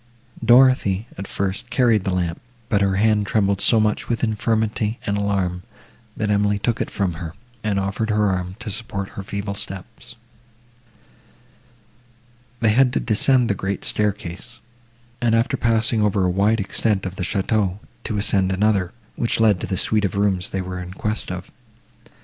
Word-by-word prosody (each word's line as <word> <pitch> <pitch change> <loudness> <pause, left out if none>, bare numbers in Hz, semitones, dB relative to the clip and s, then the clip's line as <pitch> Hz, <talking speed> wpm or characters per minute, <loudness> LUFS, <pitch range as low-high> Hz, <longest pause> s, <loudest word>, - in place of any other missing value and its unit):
Dorothée, 120 -5 +4
at 95 - -7
first, 100 +4 -3
carried 120 -5 +2
the 95 - 0
lamp, 90 -2 -2 0.3
but 100 -2 +2
her 95 -1 +2
hand 105 0 +2
trembled 100 -2 +1
so 115 - +5
much 105 0 0
with 120 0 -1
infirmity 110 0 0
and 100 - 0
alarm, 95 -3 -1 0.6
that 105 -1 0
Emily 105 0 +2
took 115 +3 -1
it - - -2
from 95 -4 -1
her, 80 -1 -6 0.3
and 105 -2 0
offered 100 +3 -2
her 105 -2 +2
arm, 90 0 -3
to 110 - -4
support 100 -2 -3
her - - -7
feeble 100 +1 -4
steps. 115 +5 -5 2.5
They 110 -2 +4
had 125 +3 +4
to - - +1
descend 125 +2 +3
the 105 - +1
great 95 0 -3
staircase, 105 +2 -2 0.6
and, 115 -1 +3
after 115 +4 +1
passing 115 -2 +2
over 105 -2 +2
a 90 - +2
wide 105 +5 +2
extent 100 0 0
of 95 0 -4
the 95 - -4
château, 100 0 0 0.3
to 105 - -2
ascend 100 -2 +1
another, 95 -2 +1 0.2
which 115 - -1
led 105 -5 +3
to - - -3
the 95 - -2
suite 105 +2 +1
of 100 -2 -1
rooms 100 -2 +1
they 95 - -2
were 90 0 -5
in 90 +1 -8
quest 110 +3 -3
of. - - -7
100 Hz, 170 wpm, -22 LUFS, 95-110 Hz, 2.5 s, so